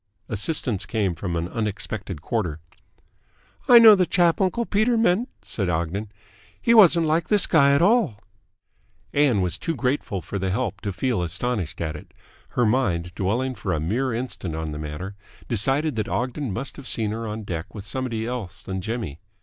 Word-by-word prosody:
Assistance 110 Hz, -, -1 dB
came 105 Hz, -6 st, 0 dB
from 85 Hz, +1 st, -4 dB
an 85 Hz, +1 st, -1 dB
unexpected 105 Hz, -5 st, -4 dB
quarter. 90 Hz, -10 st, -2 dB, 1.1 s
"I 245 Hz, -, +9 dB
know 225 Hz, -2 st, +10 dB
the 185 Hz, -3 st, +3 dB
chap 175 Hz, 0 st, +3 dB
uncle 215 Hz, +5 st, +1 dB
Peter 220 Hz, +4 st, +2 dB
meant," 225 Hz, +2 st, +2 dB
said 95 Hz, -5 st, -2 dB
Ogden. 90 Hz, +5 st, -2 dB, 0.5 s
"He 235 Hz, -, +3 dB
wasn't 175 Hz, -7 st, +7 dB
like 160 Hz, +2 st, +1 dB
this 205 Hz, -3 st, +4 dB
guy 140 Hz, -3 st, +4 dB
at 150 Hz, -, +3 dB
all." 200 Hz, -, +3 dB, 0.9 s
Ann 140 Hz, -8 st, +3 dB
was 90 Hz, 0 st, -1 dB
too 165 Hz, -, -2 dB
grateful 125 Hz, -7 st, -1 dB
for 100 Hz, +2 st, -5 dB
the 95 Hz, 0 st, -1 dB
help 105 Hz, 0 st, -2 dB
to 100 Hz, -, -3 dB
feel 115 Hz, 0 st, -1 dB
astonished 90 Hz, +1 st, -2 dB
at 80 Hz, -2 st, -2 dB
it. 75 Hz, -, -12 dB, 0.4 s
Her 120 Hz, -, +4 dB
mind, 95 Hz, -8 st, 0 dB
dwelling 120 Hz, +9 st, -1 dB
for 95 Hz, -5 st, -3 dB
a 80 Hz, -, 0 dB
mere 115 Hz, -, -1 dB
instant 115 Hz, -8 st, -4 dB
on 80 Hz, -1 st, -4 dB
the 75 Hz, -, -6 dB
matter, 75 Hz, +6 st, -6 dB, 0.3 s
decided 135 Hz, +6 st, +1 dB
that 110 Hz, -, -1 dB
Ogden 130 Hz, +1 st, -2 dB
must 125 Hz, +8 st, -4 dB
have 140 Hz, -3 st, -9 dB
seen 110 Hz, -2 st, -1 dB
her 115 Hz, +1 st, -4 dB
on 110 Hz, +1 st, -5 dB
deck 85 Hz, 0 st, -6 dB
with 100 Hz, -2 st, -7 dB
somebody 115 Hz, -2 st, -3 dB
else 115 Hz, -7 st, -5 dB
than 95 Hz, 0 st, -4 dB
Jimmy. 110 Hz, -, -4 dB
110 Hz, 180 wpm, -24 LUFS, 95-140 Hz, 1.1 s, know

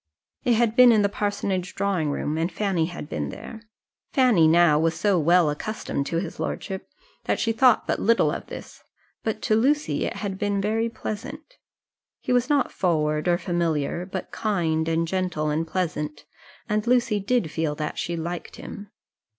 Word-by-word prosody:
It 245 Hz, -, +3 dB
had 230 Hz, -1 st, +2 dB
been 250 Hz, -1 st, +8 dB
in 215 Hz, -2 st, +4 dB
the 200 Hz, -, +2 dB
parsonage 200 Hz, -3 st, -2 dB
drawing 190 Hz, -6 st, 0 dB
room, 145 Hz, +1 st, -2 dB
and 165 Hz, +3 st, -1 dB
Fanny 190 Hz, -6 st, 0 dB
had 170 Hz, -4 st, -7 dB
been 75 Hz, -, -3 dB
there. 225 Hz, -, -9 dB, 0.5 s
Fanny 245 Hz, -, +5 dB
now 160 Hz, -2 st, +5 dB
was 165 Hz, 0 st, +1 dB
so 200 Hz, -4 st, +3 dB
well 170 Hz, 0 st, +4 dB
accustomed 145 Hz, -4 st, -3 dB
to 165 Hz, -, -1 dB
his 170 Hz, -1 st, -4 dB
lordship, 190 Hz, -1 st, -4 dB, 0.4 s
that -, -, 0 dB
she 225 Hz, -, +1 dB
thought 250 Hz, +2 st, +4 dB
but -, -, -1 dB
little 230 Hz, +3 st, +3 dB
of -, -, -5 dB
this, -, -, -10 dB, 0.4 s
but 220 Hz, -, -3 dB
to 215 Hz, -, +2 dB
Lucy 290 Hz, +7 st, +1 dB
it -, -, -3 dB
had 195 Hz, -2 st, -4 dB
been 205 Hz, -1 st, 0 dB
very 220 Hz, +3 st, 0 dB
pleasant. 225 Hz, -, -7 dB, 0.6 s
He -, -, -1 dB
was 250 Hz, +2 st, +2 dB
not 285 Hz, -3 st, +2 dB
forward 155 Hz, -3 st, 0 dB
or 175 Hz, -1 st, +3 dB
familiar, 170 Hz, -1 st, -1 dB
but 190 Hz, -1 st, -6 dB
kind, 165 Hz, -7 st, 0 dB
and 165 Hz, 0 st, +1 dB
gentle, 180 Hz, -4 st, -1 dB
and 160 Hz, +2 st, -1 dB
pleasant; 150 Hz, -4 st, -3 dB, 0.4 s
and 210 Hz, +1 st, -1 dB
Lucy 240 Hz, -4 st, +3 dB
did 200 Hz, -5 st, 0 dB
feel 160 Hz, -2 st, -1 dB
that 150 Hz, 0 st, -4 dB
she 170 Hz, 0 st, -2 dB
liked 170 Hz, +1 st, -5 dB
him. 205 Hz, -1 st, -9 dB
185 Hz, 175 wpm, -25 LUFS, 160-215 Hz, 0.6 s, been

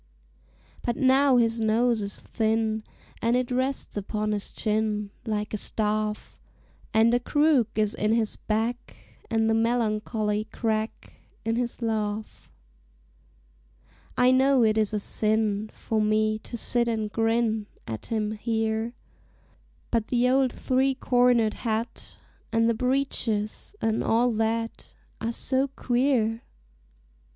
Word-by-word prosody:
But 240 Hz, -, -1 dB
now 270 Hz, -1 st, +4 dB
his 230 Hz, -1 st, +2 dB
nose 225 Hz, +1 st, +2 dB
is 200 Hz, 0 st, -5 dB
thin, 220 Hz, 0 st, 0 dB, 0.4 s
And 230 Hz, +1 st, +2 dB
it 250 Hz, 0 st, 0 dB
rests 260 Hz, +2 st, -1 dB
upon 210 Hz, +1 st, -2 dB
his 205 Hz, -1 st, -2 dB
chin 210 Hz, -1 st, -1 dB, 0.2 s
Like 210 Hz, -1 st, -2 dB
a -, -, 0 dB
staff; 215 Hz, 0 st, -2 dB, 0.5 s
And 225 Hz, +2 st, +4 dB
a 245 Hz, -, +4 dB
crook 290 Hz, -2 st, +3 dB
is 215 Hz, -1 st, +1 dB
in 210 Hz, +1 st, 0 dB
his 225 Hz, -2 st, 0 dB
back, 225 Hz, +3 st, -2 dB, 0.3 s
And 225 Hz, -1 st, +2 dB
the 225 Hz, -, +3 dB
melancholy 215 Hz, -2 st, 0 dB
crack 220 Hz, 0 st, -3 dB, 0.3 s
In 225 Hz, 0 st, +1 dB
his 240 Hz, 0 st, -2 dB
laugh. 215 Hz, -1 st, -3 dB, 1.7 s
I 250 Hz, 0 st, +5 dB
know 265 Hz, -1 st, +4 dB
it 215 Hz, -1 st, +3 dB
is 215 Hz, -2 st, +2 dB
a 210 Hz, -, -1 dB
sin 215 Hz, 0 st, 0 dB
For 220 Hz, -1 st, -2 dB
me 215 Hz, 0 st, +1 dB
to 235 Hz, -, -7 dB
sit 235 Hz, +1 st, +1 dB
and 220 Hz, -2 st, -1 dB
grin 225 Hz, -1 st, +1 dB, 0.2 s
At 110 Hz, -1 st, -6 dB
him 215 Hz, -2 st, -1 dB
here, 220 Hz, +1 st, -1 dB, 1.0 s
But 230 Hz, -2 st, +1 dB
the 245 Hz, 0 st, +2 dB
old 260 Hz, 0 st, +3 dB
three 265 Hz, +1 st, +1 dB
cornered 245 Hz, -4 st, +3 dB
hat, 225 Hz, 0 st, -4 dB, 0.3 s
And 230 Hz, 0 st, +3 dB
the 230 Hz, -, +3 dB
breeches, 250 Hz, -, -1 dB
and 225 Hz, 0 st, +1 dB
all 240 Hz, +2 st, +3 dB
that, 225 Hz, +1 st, -2 dB, 0.3 s
Are 230 Hz, -, -1 dB
so 260 Hz, +3 st, +2 dB
queer! 245 Hz, -3 st, 0 dB
225 Hz, 130 wpm, -26 LUFS, 215-245 Hz, 1.7 s, I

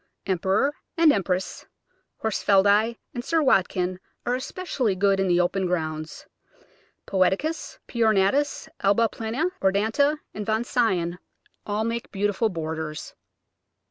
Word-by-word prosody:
Emperor 190 Hz, +9 st, +1 dB, 0.2 s
and 325 Hz, -3 st, +6 dB
Empress, 185 Hz, -1 st, -2 dB, 0.6 s
Horsfieldi, 205 Hz, +1 st, +3 dB, 0.2 s
and 240 Hz, -, -4 dB
Sir 325 Hz, +3 st, +1 dB
Watkin 185 Hz, -7 st, +2 dB, 0.3 s
are 245 Hz, -, +1 dB
especially 260 Hz, -, -2 dB
good 195 Hz, 0 st, +2 dB
in 195 Hz, -, +1 dB
the 175 Hz, -1 st, +3 dB
open 185 Hz, +1 st, +1 dB
grounds. 155 Hz, -3 st, -3 dB, 0.8 s
Poeticus, 195 Hz, -, 0 dB
P. 235 Hz, -, -4 dB
ornatus, 220 Hz, +7 st, +2 dB
Alba 205 Hz, +4 st, +3 dB
plena, 235 Hz, -, -2 dB
Odorata, 220 Hz, +10 st, +2 dB, 0.2 s
and 210 Hz, -, -4 dB
Von 220 Hz, +2 st, 0 dB
Sion 185 Hz, -8 st, 0 dB, 0.5 s
all 210 Hz, +1 st, 0 dB
make 230 Hz, +1 st, -3 dB
beautiful 205 Hz, +2 st, 0 dB
borders. 160 Hz, -3 st, -5 dB
205 Hz, 115 wpm, -25 LUFS, 185-235 Hz, 0.8 s, and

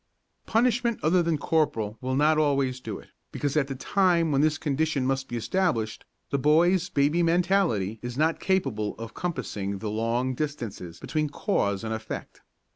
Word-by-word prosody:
Punishment 235 Hz, 0 st, +2 dB
other 175 Hz, +4 st, +4 dB
than 165 Hz, -2 st, +1 dB
corporal 130 Hz, -9 st, 0 dB
will 130 Hz, 0 st, -1 dB
not 155 Hz, +2 st, +4 dB
always 140 Hz, -4 st, +1 dB
do 110 Hz, -5 st, -6 dB
it, -, -, -15 dB, 0.2 s
because 145 Hz, 0 st, -2 dB
at 150 Hz, -3 st, +2 dB
the 135 Hz, -, -4 dB
time 170 Hz, +2 st, +2 dB
when 140 Hz, -1 st, +3 dB
this 155 Hz, 0 st, +2 dB
condition 150 Hz, -2 st, 0 dB
must 135 Hz, 0 st, -1 dB
be 120 Hz, -, -4 dB
established 115 Hz, -, -1 dB, 0.3 s
the 140 Hz, -, +1 dB
boy's 170 Hz, +5 st, +3 dB
baby 145 Hz, +5 st, +2 dB
mentality 170 Hz, -, +2 dB
is 120 Hz, 0 st, -6 dB
not 160 Hz, +2 st, +2 dB
capable 110 Hz, -, 0 dB
of 115 Hz, 0 st, -7 dB
compassing 100 Hz, -, -3 dB
the 105 Hz, +2 st, -4 dB
long 115 Hz, +4 st, 0 dB
distances 120 Hz, -, -5 dB
between 155 Hz, -1 st, -1 dB
cause 100 Hz, -, -1 dB
and 110 Hz, 0 st, -2 dB
effect. 110 Hz, 0 st, -6 dB
145 Hz, 165 wpm, -26 LUFS, 115-165 Hz, 0.3 s, other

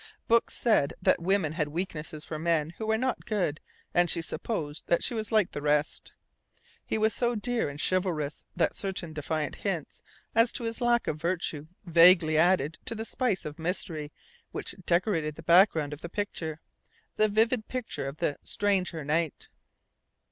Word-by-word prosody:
Books 230 Hz, 0 st, +3 dB
said 215 Hz, -, +2 dB
that -, -, +2 dB
women 185 Hz, -3 st, +1 dB
had 155 Hz, -2 st, -1 dB
a -, -, -9 dB
weakness 155 Hz, -2 st, -5 dB
for 155 Hz, -, -5 dB
men 165 Hz, -1 st, +1 dB
who 220 Hz, -, -3 dB
were 220 Hz, 0 st, +2 dB
not 255 Hz, +1 st, -1 dB
good 180 Hz, -8 st, 0 dB, 0.3 s
and 175 Hz, 0 st, +3 dB
she 165 Hz, -, +2 dB
supposed 160 Hz, -5 st, -4 dB
that 170 Hz, -, +2 dB
she -, -, 0 dB
was 220 Hz, -1 st, -3 dB
like 215 Hz, -5 st, +3 dB
the 145 Hz, -, -5 dB
rest. 150 Hz, +1 st, 0 dB, 0.7 s
He -, -, -2 dB
was 220 Hz, 0 st, +2 dB
so 240 Hz, -1 st, +1 dB
dear 235 Hz, -, -1 dB
and 145 Hz, +1 st, -8 dB
chivalrous 165 Hz, -5 st, 0 dB
that -, -, +1 dB
certain 185 Hz, -5 st, -4 dB
defiant 155 Hz, 0 st, -3 dB
hints 180 Hz, -7 st, -4 dB, 0.3 s
as 230 Hz, +1 st, +5 dB
to -, -, -2 dB
his 230 Hz, +1 st, -3 dB
lack 240 Hz, -1 st, +3 dB
of 155 Hz, 0 st, -3 dB
virtue 165 Hz, -4 st, -1 dB, 0.2 s
vaguely 170 Hz, -1 st, +6 dB
added 160 Hz, -2 st, +3 dB
to 230 Hz, -, -2 dB
the 225 Hz, 0 st, -4 dB
spice 230 Hz, -6 st, -1 dB
of 150 Hz, 0 st, -7 dB
mystery 160 Hz, -3 st, -3 dB, 0.4 s
which -, -, -4 dB
decorated 170 Hz, -4 st, +1 dB
the 160 Hz, -, -11 dB
background 165 Hz, -4 st, +4 dB
of 150 Hz, -, -9 dB
the 170 Hz, -, -6 dB
picture 165 Hz, -6 st, -4 dB, 0.6 s
the 215 Hz, -, +4 dB
vivid 220 Hz, +2 st, +1 dB
picture 225 Hz, -, -4 dB
of 140 Hz, +2 st, -6 dB
the 145 Hz, -, -1 dB
"stranger 185 Hz, -5 st, 0 dB
knight." 155 Hz, +1 st, -1 dB
170 Hz, 175 wpm, -28 LUFS, 155-215 Hz, 0.7 s, vaguely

